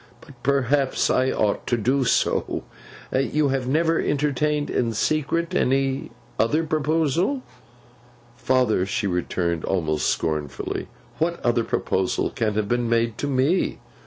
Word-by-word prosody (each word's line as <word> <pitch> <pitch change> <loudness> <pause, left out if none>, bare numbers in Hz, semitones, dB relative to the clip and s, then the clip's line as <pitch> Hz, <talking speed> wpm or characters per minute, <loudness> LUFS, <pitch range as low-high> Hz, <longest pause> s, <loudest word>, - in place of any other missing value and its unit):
But 130 -2 -17
perhaps 140 0 +1
I 130 +1 +2
ought 105 -5 0
to 120 - +1
do 130 +4 +1
so. - - +1 0.5
You 140 +2 +1
have 135 -2 -1
never 165 +4 +2
entertained 150 +1 0
in 115 -2 0
secret 155 +6 0
any 135 +1 +1 0.3
other 150 +9 +2
proposal?' 160 - 0 0.9
'Father,' 125 -8 +1
she 100 - -1
returned, 85 -2 -1
almost 80 -5 0
scornfully, 75 -3 -2 0.3
'what 170 +1 0
other 120 -1 +2
proposal 95 -4 -1
can 110 -5 -1
have 105 -1 0
been 120 0 0
made 115 -1 +1
to 145 - -1
me? 140 +6 +1
130 Hz, 130 wpm, -23 LUFS, 110-150 Hz, 0.9 s, I